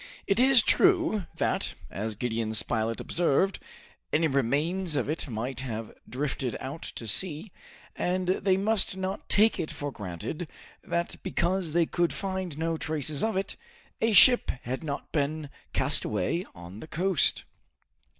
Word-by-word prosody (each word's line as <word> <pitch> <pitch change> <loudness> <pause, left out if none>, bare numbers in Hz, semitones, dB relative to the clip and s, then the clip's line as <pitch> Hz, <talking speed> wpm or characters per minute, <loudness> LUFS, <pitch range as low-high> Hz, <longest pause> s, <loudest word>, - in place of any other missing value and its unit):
It 195 +2 +2
is 260 -2 +6
true 335 - +3
that, - - 0 0.2
as 110 +2 -3
Gideon 115 -1 -2
Spilett 115 +1 0
observed, 175 +3 +1 0.5
any 160 +2 +3
remains 150 +6 0
of - - 0
it 155 +1 -2
might 120 +1 -4
have 115 -4 -5 0.2
drifted 130 -2 -2
out 140 +5 -6
to 115 - -5
sea, 160 - -2 0.4
and 185 0 -1
they 190 0 +2
must 200 -1 +1
not 190 +1 -4
take 220 +2 +4
it 155 - -2
for 145 0 -5
granted 100 - -5 0.4
that 170 0 -2
because 175 -2 -1
they 170 0 +4
could 175 +1 0
find 190 -5 -4
no 165 0 -1
traces 155 -2 -2
of 220 -3 0
it, 195 +1 -2 0.4
a 225 - +3
ship 245 +4 +8
had 130 +6 -4
not 145 -3 -5
been 150 -1 -1 0.2
castaway 130 - 0
on 85 +3 -10
the 155 - -9
coast. 180 +1 +2
160 Hz, 145 wpm, -28 LUFS, 130-190 Hz, 0.5 s, ship